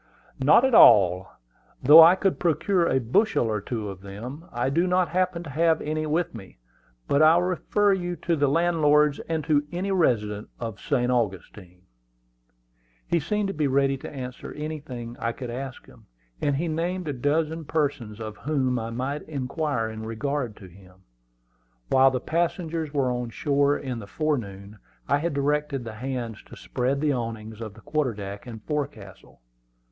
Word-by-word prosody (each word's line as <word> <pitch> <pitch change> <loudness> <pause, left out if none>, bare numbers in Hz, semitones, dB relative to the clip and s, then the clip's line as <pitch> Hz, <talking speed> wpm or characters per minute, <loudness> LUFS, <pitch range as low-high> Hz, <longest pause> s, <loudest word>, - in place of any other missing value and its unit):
"Not 150 - +5
at 265 - +1
all. 95 - +7 0.6
Though 150 +5 +10
I 170 +3 +8
could 190 0 0
procure 175 +1 +1
a 130 - +2
bushel 130 - +2
or 110 -2 -1
two 110 0 -4
of 95 -2 -8
them, 115 - -8
I 120 +3 -1
do 170 +5 +2
not 180 -2 +2
happen 180 0 0
to 155 - -9
have 160 +2 +2
any 155 +1 -2
with 160 +3 -1
me; 100 -5 -11 0.5
but 140 - +2
I 155 +1 +7
will 175 - +3
refer 195 +3 +1
you 175 -2 -2
to 170 -1 -1
the 145 -2 +2
landlords, 150 -2 +3
and 160 -2 -1
to 145 0 +2
any 185 +3 -2
resident 105 - 0
of 115 -3 -5
St. 125 -4 0
Augustine." 95 -5 -3 1.2
He 170 - +1
seemed 205 +6 -1
to - - -3
be 150 -2 0
ready 135 0 +2
to - - -8
answer 130 -3 -7
anything 140 -6 -6
I 115 0 -1
could 125 -3 -7
ask 130 +1 -7
him, - - -19 0.3
and 145 -1 +1
he 165 +5 -1
named 170 +2 -2
a 145 - -1
dozen 155 +4 -1
persons 135 -9 -2
of 110 -1 -7
whom 130 -5 -1
I 115 0 -4
might 130 +5 -3
inquire 140 -3 -2
in 110 0 -7
regard 115 +2 -3
to 100 - -13
him. 95 +1 -18 0.9
While 135 0 +6
the 130 -1 -2
passengers 165 0 -2
were 135 -4 0
on 125 -1 -3
shore 140 +3 +1
in 130 -4 -5
the 100 - -9
forenoon, 100 -5 -3 0.3
I - - +2
had 165 -1 -2
directed 145 -1 0
the 115 -1 -7
hands 120 -2 -5
to - - -12
spread 125 - -2
the 150 -2 +2
awnings 115 -2 -5
on 110 -3 -6
the 110 - -16
quarter 145 -5 -1
deck 100 +2 -7
and 110 -3 -9
forecastle. 135 - -6
140 Hz, 175 wpm, -25 LUFS, 115-160 Hz, 1.2 s, Though